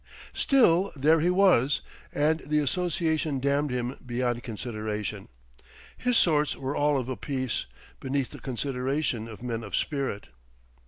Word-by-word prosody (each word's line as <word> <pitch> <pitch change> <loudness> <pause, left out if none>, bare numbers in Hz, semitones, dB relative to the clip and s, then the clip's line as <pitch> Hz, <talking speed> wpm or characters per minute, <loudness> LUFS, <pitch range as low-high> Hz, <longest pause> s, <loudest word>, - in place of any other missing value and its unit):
Still, 200 -9 +4
there 155 +4 +4
he 170 +3 +2
was: 180 -8 +4 0.3
and 155 +2 +2
the 150 +1 -1
association 160 -1 0
damned 140 +2 +1
him 125 0 -2
beyond 120 -1 -1
consideration. 105 -3 -4 0.7
His 250 -1 +1
sorts 150 -3 +3
were 135 +1 -3
all 145 0 +2
of 125 -2 -2
a 130 - -2
piece, 130 - -3 0.3
beneath 135 -1 -2
the - - -10
consideration 130 -1 -2
of 115 +1 -10
men 115 -2 -3
of 100 - -4
spirit.... 135 -8 -2
135 Hz, 140 wpm, -27 LUFS, 120-155 Hz, 0.7 s, Still